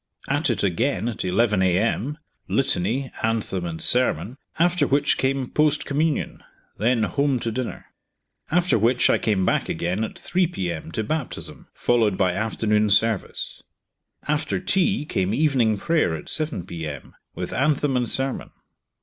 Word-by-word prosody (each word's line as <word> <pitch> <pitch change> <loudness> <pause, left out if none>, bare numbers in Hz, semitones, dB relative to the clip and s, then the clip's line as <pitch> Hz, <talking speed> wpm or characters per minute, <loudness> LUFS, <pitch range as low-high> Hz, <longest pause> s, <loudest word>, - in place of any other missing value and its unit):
At 145 +2 +1
it 110 -5 0
again 100 +4 0
at 120 - -3
11 100 +2 +2
a.m., 110 +9 +1 0.3
litany, 130 +1 0
anthem, 110 -5 -1
and 80 -1 -5
sermon; 125 - +1 0.2
after 170 -2 +3
which 140 +1 +2
came 135 -1 0
post 150 -1 +2
communion; 150 +2 -1 0.4
then 115 +1 +2
home 140 +3 +1
to 115 - -2
dinner. 125 +1 -4 0.6
After 175 -8 +2
which 120 +3 +3
I - - +2
came 100 -4 +1
back - - +1
again 90 +6 -1
at 110 - -5
3 180 -1 +1
p.m. 85 - -4
to 110 - -1
baptism, 155 +3 -5
followed 110 -5 +2
by 95 -2 +3
afternoon 105 +1 +1
service. 110 +1 +1 0.7
After 150 0 0
tea 185 -2 +1
came 95 -6 0
evening 130 -8 +2
prayer, 155 - +1
at 80 - -8
7 150 - -2
p.m., 80 -6 -7 0.2
with - - -4
anthem 140 0 +1
and 125 -2 0
sermon. 135 0 -2
120 Hz, 145 wpm, -23 LUFS, 100-145 Hz, 0.7 s, after